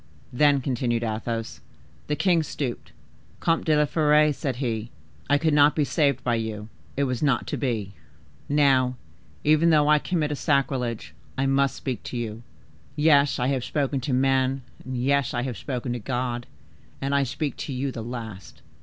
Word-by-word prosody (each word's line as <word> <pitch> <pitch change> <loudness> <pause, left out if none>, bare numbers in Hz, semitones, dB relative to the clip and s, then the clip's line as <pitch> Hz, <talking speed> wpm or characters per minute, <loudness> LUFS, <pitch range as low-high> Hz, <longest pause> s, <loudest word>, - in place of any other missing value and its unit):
"Then," 145 +1 +4
continued 120 -2 -1
Athos, 115 0 -3 0.5
"the 150 - 0
king 175 0 +3
stooped. 140 -5 -4 0.5
'Comte 165 0 +1
de 155 -2 +3
la 150 - +4
Fere,' 150 0 +3
said 135 -1 -3
he, 115 -3 -3 0.4
'I 145 - +5
could 160 +1 +1
not 145 0 +5
be 150 - +2
saved 140 -3 +1
by 120 - +1
you: 110 -2 -3 0.3
it 140 - +2
was 125 -3 -1
not 135 -5 +2
to - - -3
be. 110 -7 -2 0.6
Now, 135 -3 +3 0.5
even 155 +2 +4
though 150 -2 +4
I 150 0 +5
commit 155 -3 -1
a - - -1
sacrilege, 135 -6 -1 0.2
I 135 - +1
must 135 0 +2
speak 125 -5 -4
to 125 - -4
you. 115 -1 -4 0.5
Yes, 145 -2 +4
I 125 - 0
have 135 -3 0
spoken 140 -1 -1
to 130 - -3
men—yes, 130 0 0
I 120 - 0
have 125 -2 -3
spoken 125 -1 -4
to 120 - -3
God, 120 +1 -3 0.5
and 140 +1 -2
I 140 - +3
speak 135 +1 -2
to - - -5
you 135 +1 -2
the 120 - -6
last. 110 -6 -8
135 Hz, 170 wpm, -25 LUFS, 120-145 Hz, 0.6 s, I